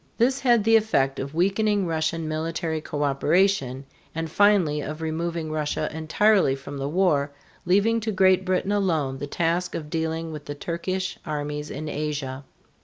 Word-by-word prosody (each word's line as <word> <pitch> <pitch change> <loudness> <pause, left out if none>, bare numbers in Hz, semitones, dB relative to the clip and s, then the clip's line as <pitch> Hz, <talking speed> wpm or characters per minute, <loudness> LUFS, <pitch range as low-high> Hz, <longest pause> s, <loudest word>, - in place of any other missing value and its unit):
This 260 +4 +2
had 240 -5 +3
the 225 +1 +6
effect 135 -12 +1
of 140 +3 -5
weakening 200 +3 +2
Russian 160 0 -1
military 160 +1 -2
coöperation, 145 -1 +1 0.3
and 165 -1 -3
finally 185 -7 +3
of 155 +2 -5
removing 160 0 -3
Russia 155 0 -2
entirely 160 0 +3
from 140 +1 -8
the 135 +1 -2
war, 155 -4 +2 0.4
leaving 205 +5 +3
to 220 0 -2
Great 190 -1 +4
Britain 185 +1 0
alone 160 -10 0
the 145 - -4
task 170 +4 -1
of 150 -2 -6
dealing 160 0 -2
with 150 -1 -8
the 145 - -5
Turkish 185 +4 -3
armies 150 -1 -4
in 155 +3 -5
Asia. 145 -3 -3
160 Hz, 155 wpm, -25 LUFS, 150-190 Hz, 0.4 s, the